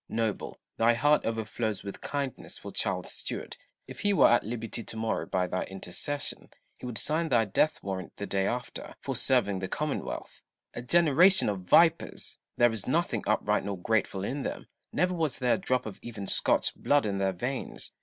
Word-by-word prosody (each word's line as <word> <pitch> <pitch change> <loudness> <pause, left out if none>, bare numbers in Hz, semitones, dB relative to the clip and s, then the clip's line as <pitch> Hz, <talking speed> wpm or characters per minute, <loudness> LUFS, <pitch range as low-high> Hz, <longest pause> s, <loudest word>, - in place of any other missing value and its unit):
Noble, 110 -2 -2 0.2
thy 115 +1 +4
heart 145 +5 +3
overflows 110 -1 -2
with 100 - -7
kindness 140 -3 -4
for - - -8
Charles - - -2
Stuart: - - -5 0.3
if - - -9
he 205 -1 +2
were - - +6
at 120 - +4
liberty 115 +1 -5
to 110 - -8
morrow 110 0 -1
by 90 -1 +1
thy 90 +1 -2
intercession, 120 +10 -5 0.3
he - - -8
would 120 -3 -4
sign 160 +2 0
thy 115 -3 +4
death 150 +9 +2
warrant 95 -2 -5
the 100 - -3
day 95 -1 0
after, 125 0 -4
for 135 - -4
serving 120 -5 +2
the 95 - -3
Commonwealth. 140 - -4 0.3
A - - -5
generation 170 - +5
of 95 -3 -4
vipers! 165 -1 +3 0.2
there 120 -1 +5
is 110 -3 -3
nothing - - +1
upright - - +2
nor 100 -1 -3
grateful 100 0 0
in 135 +7 -2
them: - - -4 0.3
never 180 0 +1
was 160 -6 +1
there 125 -1 +2
a - - +2
drop 130 -8 0
of 105 -3 -7
even 110 -4 -6
Scotch - - +2
blood 145 -3 +2
in 100 -2 -1
their 95 -1 +1
veins. 125 +9 -4
115 Hz, 185 wpm, -29 LUFS, 100-140 Hz, 0.3 s, were